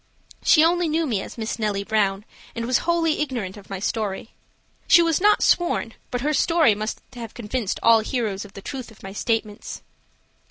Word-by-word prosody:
She 310 Hz, -, +5 dB
only 345 Hz, 0 st, +2 dB
knew 320 Hz, +2 st, +1 dB
me 220 Hz, -9 st, -1 dB
as -, -, -9 dB
Miss 220 Hz, +1 st, -4 dB
Nellie 205 Hz, -2 st, -1 dB
Brown, 200 Hz, -1 st, 0 dB, 0.3 s
and 230 Hz, -1 st, -3 dB
was 250 Hz, +1 st, +2 dB
wholly 330 Hz, -3 st, +2 dB
ignorant 240 Hz, -10 st, -3 dB
of 205 Hz, -2 st, -14 dB
my 195 Hz, -, -4 dB
story. 205 Hz, +1 st, -3 dB, 0.6 s
She 340 Hz, -, +7 dB
was 330 Hz, 0 st, +1 dB
not 420 Hz, +1 st, +4 dB
sworn, 340 Hz, -9 st, +2 dB, 0.2 s
but 245 Hz, -, -3 dB
her 300 Hz, +3 st, 0 dB
story 325 Hz, -5 st, +4 dB
must 215 Hz, +2 st, -4 dB
have 235 Hz, -3 st, -8 dB
convinced 230 Hz, -2 st, -3 dB
all 230 Hz, -1 st, +7 dB
hearers 220 Hz, -4 st, -2 dB
of 205 Hz, -, -13 dB
the 195 Hz, -, -10 dB
truth 260 Hz, -3 st, -6 dB
of 220 Hz, -, -18 dB
my 195 Hz, 0 st, -7 dB
statements. 215 Hz, -1 st, -3 dB
230 Hz, 190 wpm, -23 LUFS, 205-300 Hz, 0.6 s, She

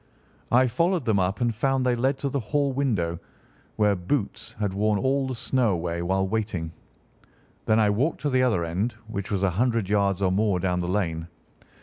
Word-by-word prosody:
I 125 Hz, +2 st, +5 dB
followed 165 Hz, +5 st, +1 dB
them 110 Hz, -4 st, +2 dB
up 95 Hz, +5 st, -1 dB
and 120 Hz, -1 st, +2 dB
found 135 Hz, +3 st, 0 dB
they 125 Hz, -, +3 dB
led 130 Hz, +3 st, +1 dB
to 140 Hz, -, 0 dB
the 140 Hz, -, -1 dB
hall 140 Hz, +4 st, 0 dB
window, 100 Hz, -12 st, 0 dB, 0.6 s
where 105 Hz, -2 st, +3 dB
Boots 115 Hz, +3 st, -3 dB
had 105 Hz, -4 st, -2 dB
worn 105 Hz, +1 st, +1 dB
all 135 Hz, +4 st, +1 dB
the 130 Hz, -, -3 dB
snow 125 Hz, 0 st, +1 dB
away 85 Hz, 0 st, -2 dB
while 95 Hz, +2 st, 0 dB
waiting. 95 Hz, -6 st, -2 dB, 1.0 s
Then 110 Hz, 0 st, +4 dB
I 105 Hz, -2 st, +4 dB
walked 135 Hz, +10 st, 0 dB
to 145 Hz, 0 st, -1 dB
the 130 Hz, 0 st, +3 dB
other 110 Hz, -10 st, +2 dB
end, 95 Hz, +9 st, -1 dB
which 105 Hz, -2 st, -5 dB
was 100 Hz, -2 st, -1 dB
a 95 Hz, -, +3 dB
hundred 115 Hz, +1 st, 0 dB
yards 100 Hz, -2 st, +1 dB
or 95 Hz, -, +3 dB
more 100 Hz, -1 st, +1 dB
down 90 Hz, 0 st, 0 dB
the 90 Hz, -, -2 dB
lane. 85 Hz, -4 st, -1 dB
105 Hz, 200 wpm, -25 LUFS, 95-125 Hz, 1.0 s, I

